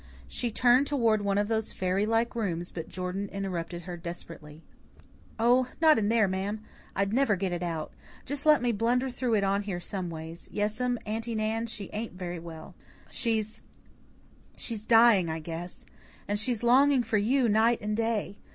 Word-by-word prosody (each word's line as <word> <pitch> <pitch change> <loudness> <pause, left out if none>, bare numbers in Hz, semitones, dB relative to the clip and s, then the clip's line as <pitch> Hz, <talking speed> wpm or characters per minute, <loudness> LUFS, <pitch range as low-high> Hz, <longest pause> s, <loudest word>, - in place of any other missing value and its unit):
She 240 - -2
turned 250 +4 +4
toward 230 -7 +2
one 200 -1 0
of 205 0 +1
those 220 -1 0
fairy 190 +3 0
like 225 +1 +1
rooms, 175 -6 -2
but 165 -2 -6
Jordan 185 +2 -4
interrupted 175 -3 -4
her 175 0 -6
desperately. 165 -2 -9 0.7
"Oh, 245 +2 +3
not 315 -5 +6
in 205 -1 +1
there, 225 -2 +4
ma'am. 195 +3 -3 0.3
I'd 200 +1 0
never 255 -4 +3
get 190 0 -2
it 175 0 -3
out. 165 -3 -3 0.3
Just 285 +1 -2
let 300 -4 +5
me 245 - +2
blunder 245 +4 +1
through 245 -2 0
it 205 - +2
out 195 +1 +1
here 185 -4 -3
someways. 170 -3 -6
Yes'm, 220 +4 0
Aunty 225 +2 -3
Nan, 220 +1 -1
she 205 -3 -7
ain't 220 -1 -4
very 175 -1 -5
well. 160 -1 -10 0.4
She's 220 -2 -1 1.0
she's 225 -3 -3
dying, 225 -7 +6
I 160 - -2
guess. 165 +2 -7 0.4
And 205 0 +1
she's 240 0 0
longing 260 +2 +5
for 220 -2 +1
you 245 +4 +2
night 225 +2 +3
and 210 +1 -2
day. 220 -3 -1
210 Hz, 170 wpm, -28 LUFS, 180-235 Hz, 1.0 s, not